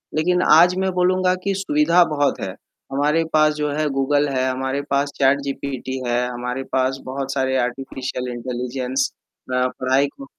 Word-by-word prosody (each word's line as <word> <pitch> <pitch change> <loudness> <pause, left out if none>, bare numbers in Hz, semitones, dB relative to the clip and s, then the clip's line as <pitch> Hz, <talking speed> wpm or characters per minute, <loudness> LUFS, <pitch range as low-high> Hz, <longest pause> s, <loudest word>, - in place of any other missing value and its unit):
लेकिन 180 +3 +2
आज 175 +3 +7
मैं 190 0 0
बोलूँगा 185 0 +2
कि 200 - 0
सुविधा 170 -1 +3
बहुत 145 -1 +1
है, - - -3 0.4
हमारे 150 +4 +2
पास 155 0 +4
जो 150 -1 -2
है 150 +1 0
गूगल 145 +2 +1
है, 130 -1 0
हमारे 130 +2 -2
पास 140 +1 +1
चैटजीपीटी 135 -1 -1
है, 120 +1 +1
हमारे 125 +2 -4
पास 130 0 +1
बहुत 135 +1 -4
सारे 130 -1 0
आर्टिफिशियल 125 0 -5
इंटेलिजेंस 125 +2 -2 0.4
अ, 125 0 +2
पढ़ाई 130 +2 +2
को 275 - -11
140 Hz, 155 wpm, -21 LUFS, 130-150 Hz, 0.4 s, आज